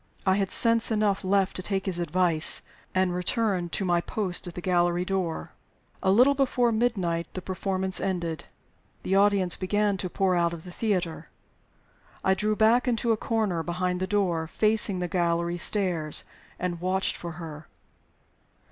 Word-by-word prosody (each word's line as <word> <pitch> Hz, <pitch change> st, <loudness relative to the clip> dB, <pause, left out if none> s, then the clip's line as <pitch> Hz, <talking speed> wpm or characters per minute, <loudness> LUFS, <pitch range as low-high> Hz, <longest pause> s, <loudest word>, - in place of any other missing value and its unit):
I 190 Hz, -, +4 dB
had 195 Hz, -2 st, 0 dB
sense 230 Hz, -1 st, +4 dB
enough 210 Hz, -3 st, 0 dB
left 195 Hz, 0 st, +1 dB
to -, -, -4 dB
take 195 Hz, +1 st, -3 dB
his 185 Hz, -3 st, 0 dB
advice, 175 Hz, -2 st, +3 dB, 0.3 s
and 185 Hz, -1 st, +2 dB
return 180 Hz, -1 st, -1 dB
to 195 Hz, -, -2 dB
my 175 Hz, -1 st, +2 dB
post 185 Hz, -2 st, -2 dB
at 175 Hz, -, -8 dB
the -, -, -5 dB
gallery 175 Hz, 0 st, +1 dB
door. 185 Hz, -4 st, -3 dB, 0.5 s
A 190 Hz, -, +1 dB
little 250 Hz, +8 st, +5 dB
before 255 Hz, -3 st, +1 dB
midnight 190 Hz, -8 st, 0 dB
the 185 Hz, -, -4 dB
performance 190 Hz, 0 st, -2 dB
ended. 170 Hz, -4 st, -3 dB, 0.6 s
The 190 Hz, -, -2 dB
audience 195 Hz, -2 st, +3 dB
began 205 Hz, +1 st, 0 dB
to 185 Hz, 0 st, -4 dB
pour 190 Hz, +1 st, +1 dB
out 170 Hz, -1 st, +1 dB
of 165 Hz, -1 st, -8 dB
the 180 Hz, -, -10 dB
theater. 180 Hz, -5 st, -2 dB, 0.9 s
I 190 Hz, -, +3 dB
drew 210 Hz, +3 st, 0 dB
back 225 Hz, +4 st, +3 dB
into 235 Hz, -1 st, +1 dB
a -, -, +3 dB
corner 215 Hz, -7 st, -1 dB
behind 180 Hz, +2 st, -2 dB
the 185 Hz, -, -2 dB
door, 180 Hz, -5 st, 0 dB
facing 210 Hz, +1 st, +2 dB
the 180 Hz, 0 st, -2 dB
gallery 170 Hz, 0 st, -1 dB
stairs, 175 Hz, -7 st, +1 dB, 0.3 s
and 175 Hz, -2 st, -4 dB
watched 185 Hz, +1 st, 0 dB
for 170 Hz, -1 st, -7 dB
her. 155 Hz, -2 st, -9 dB
185 Hz, 165 wpm, -26 LUFS, 175-205 Hz, 0.9 s, little